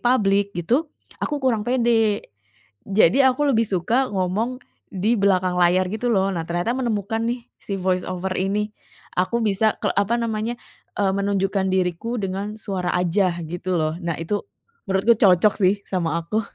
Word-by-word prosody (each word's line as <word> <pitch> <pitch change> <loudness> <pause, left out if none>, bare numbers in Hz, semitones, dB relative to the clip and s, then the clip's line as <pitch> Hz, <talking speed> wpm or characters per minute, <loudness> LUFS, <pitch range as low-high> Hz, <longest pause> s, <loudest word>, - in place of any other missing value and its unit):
public 200 -5 +2
gitu 245 - 0 0.3
aku 295 - -1
kurang 260 -6 +1
pede. 230 -4 +2 0.6
Jadi 200 +4 +4
aku 265 +3 +3
lebih 225 -1 +2
suka 225 +8 +1
ngomong 200 +6 -1 0.3
di 205 +4 0
belakang 185 -2 +2
layar 180 +2 +4
gitu 220 +3 -2
loh. 195 -2 +2
Nah, 165 -3 -3
ternyata 175 +7 0
menemukan 225 -3 -1
nih 240 0 -3 0.2
si 200 - -4
voice 185 -1 0
over 185 +1 -3
ini 205 +2 -1 0.5
aku 235 +6 0
bisa 215 +1 +2
kel - - 0
apa 205 +4 +2
namanya, 230 0 -2 0.4
eee, 195 -2 +1
menunjukkan 195 0 0
diriku 190 +6 -1
dengan 195 +2 -3
suara 190 -4 -3
aja 180 0 +1
gitu 175 +3 -3
loh. 155 -1 0
Nah, 170 -3 -2
itu 170 +6 -2 0.5
menurutku 195 +4 +4
cocok 195 +1 +5
sih 190 0 +4
sama 170 -4 -1
aku. 190 +7 -1
200 Hz, 155 wpm, -22 LUFS, 185-225 Hz, 0.6 s, cocok